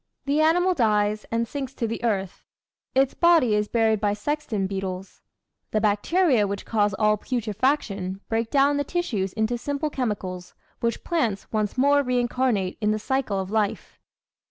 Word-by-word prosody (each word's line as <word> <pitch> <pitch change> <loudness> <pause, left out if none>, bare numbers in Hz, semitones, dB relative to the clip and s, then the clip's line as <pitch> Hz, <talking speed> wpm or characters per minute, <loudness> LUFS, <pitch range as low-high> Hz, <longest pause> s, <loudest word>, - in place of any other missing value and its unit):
The 290 +2 +2
animal 355 +4 +3
dies 210 -5 +1
and 230 0 -1
sinks 270 0 -5
to 235 - -2
the 230 +1 -4
earth; 195 -5 -2 0.5
its 270 0 +3
body 330 -10 +4
is 210 0 +1
buried 220 -2 +2
by 205 -1 +2
sexton 220 -2 -2
beetles; 190 -1 -5 0.5
the 215 - +1
bacteria 220 - +2
which 200 0 -5
cause 205 -3 +1
all 210 0 +2
putrefaction 210 -4 -1
break 225 0 -1
down 285 0 +3
the 285 - +1
tissues 250 - -2
into 220 +2 -1
simple 285 +3 -2
chemicals, 190 -8 -4 0.2
which 230 0 -2
plants 235 - -1
once 215 +1 -1
more 285 +2 +4
reincarnate 245 -6 0
in 210 - +2
the 215 - +1
cycle 220 -3 -1
of 190 0 -4
life. 215 -2 -2
225 Hz, 155 wpm, -24 LUFS, 205-270 Hz, 0.5 s, body